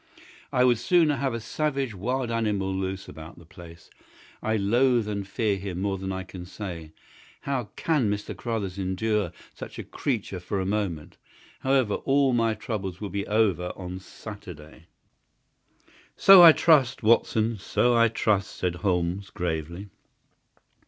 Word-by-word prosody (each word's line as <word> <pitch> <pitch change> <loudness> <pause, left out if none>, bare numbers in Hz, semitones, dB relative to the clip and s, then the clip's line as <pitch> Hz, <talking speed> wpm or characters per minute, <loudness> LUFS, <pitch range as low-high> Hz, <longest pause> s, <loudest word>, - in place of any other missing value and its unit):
I 125 -2 +3
would 120 -3 +3
sooner 165 -4 +3
have 130 -2 -1
a - - -3
savage 135 0 -2
wild 120 +5 -2
animal 105 -4 -1
loose 95 0 -4
about 80 0 -11
the 85 - -15
place. 85 0 -14 0.5
I 110 - 0
loathe 120 +3 +2
and 100 -2 -4
fear 100 0 0
him 95 -2 -5
more 95 0 -1
than 95 0 -4
I 95 0 -4
can 90 -1 -10
say. 85 -5 -7 0.5
How 135 -4 -2
CAN 150 -10 +1
Mr. 105 0 -3
Carruthers 105 -6 -4
endure 95 0 -1 0.2
such - - -9
a - - -5
creature 110 -8 -3
for 95 +2 -3
a 95 - -2
moment? 95 -6 -3 0.4
However, 130 -5 +1
all 135 -1 +2
my 115 -2 +1
troubles 105 -5 -5
will 105 -2 -5
be 100 0 -3
over 100 -5 +1
on 90 0 -7
Saturday." 90 -6 -11 1.3
"So 195 -2 +9
I 170 -2 +11
trust, 140 -7 +3
Watson; 110 0 +2
so 120 +5 +1
I 115 0 +5
trust," 105 -3 0
said 90 -1 -2
Holmes, 90 +1 -1
gravely. 85 +3 -4
105 Hz, 150 wpm, -26 LUFS, 95-120 Hz, 1.3 s, I